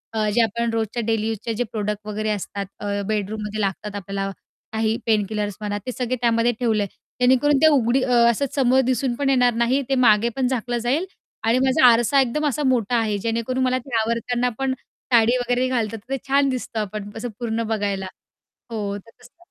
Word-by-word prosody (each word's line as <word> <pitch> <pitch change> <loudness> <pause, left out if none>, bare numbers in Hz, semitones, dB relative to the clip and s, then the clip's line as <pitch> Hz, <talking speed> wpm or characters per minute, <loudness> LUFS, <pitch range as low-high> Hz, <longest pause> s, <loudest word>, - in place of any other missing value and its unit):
अ, 215 -1 +1
जे 235 - +4
आपण 230 +1 0
रोजच्या 225 +1 -1
डेली 220 -1 0
यूजचे 225 +1 -3
जे - - +3
प्रॉडक्ट 210 -1 -3
वगैरे, 215 +1 -2
असतात. 200 -1 -3
अ, 205 0 -2
बेडरूममध्ये 210 0 -2
लागतात 200 +1 -3
आपल्याला 195 0 -3 0.4
काही 220 0 +1
पेन 215 -3 +2
किलर्स 210 -2 -2
म्हणा, 205 -1 -2
ते 255 - -2
सगळे 250 0 -2
त्यामध्ये 230 0 +3
ठेवलं 220 -4 +1
आहे. 200 - -5 0.3
जेणेकरून 260 +3 +4
ते 315 - +7
उघडी 255 0 +2
असं 235 0 +3
समोर 260 -1 +4
दिसून 255 0 0
पण 280 +2 0
येणार 250 -2 +4
नाही. 235 +4 +1
ते 270 - +2
मागे 215 +1 +5
पण 265 -2 +1
झाकलं 245 -1 -1
जाईल, 255 +9 0 0.4
आणि 230 +3 +3
माझा 265 +2 +4
आरसा 240 +4 +5
एकदम 265 +4 -1
असा 295 +1 -1
मोठा 245 -3 +1
आहे. 215 -3 0
जेणेकरून 230 +4 -1
मला 255 0 +2
ते 260 -4 -4
आवरताना 235 +2 0
पण, 270 -1 0 0.4
साडी 235 +1 +5
वगैरे 245 +1 0
घालतात 230 -3 -1
तर 250 +6 -7
ते - - 0
छान 275 0 +3
दिसतं 250 -3 -3
आपण, 210 0 -4
असं 245 +2 -4
पूर्ण 230 -1 -1
बघायला. 200 -2 -2 0.7
हो, 205 -3 -3
तर 225 +3 -15
तसं. 250 +5 -18
230 Hz, 195 wpm, -22 LUFS, 215-255 Hz, 0.7 s, ते